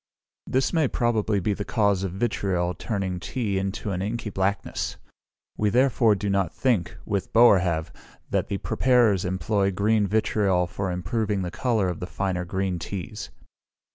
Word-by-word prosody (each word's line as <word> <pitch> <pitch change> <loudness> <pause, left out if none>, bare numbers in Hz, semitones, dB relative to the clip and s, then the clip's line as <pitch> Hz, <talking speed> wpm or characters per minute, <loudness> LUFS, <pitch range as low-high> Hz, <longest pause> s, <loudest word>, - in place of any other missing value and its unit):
This 130 +6 +1
may 160 -4 +3
probably 110 -4 +1
be 100 +3 0
the 100 - -4
cause 100 -4 +1
of 95 - -2
vitriol 95 -4 -1
turning 95 -1 -3
tea 105 -1 -2
into 100 +2 -3
an 90 -1 -2
inky 110 +2 -3
blackness. 95 +1 -2 0.6
We 105 - +3
therefore 120 -2 +3
do 100 +1 -4
not 95 -4 +1
think 115 -10 0
with 100 -2 -2
Boerhaave, 90 -9 +4 0.4
that - - 0
the 100 - -2
preparers 115 -5 +2
employ 95 +2 0
green 105 +2 +2
vitriol 100 -3 +1
for 95 +2 -4
improving 100 +3 -1
the 90 - -4
colour 115 -5 0
of 90 -2 -3
the 90 - -5
finer 90 -1 -2
green 95 -1 -2
teas. 100 +5 -6
100 Hz, 155 wpm, -25 LUFS, 95-110 Hz, 0.6 s, Boerhaave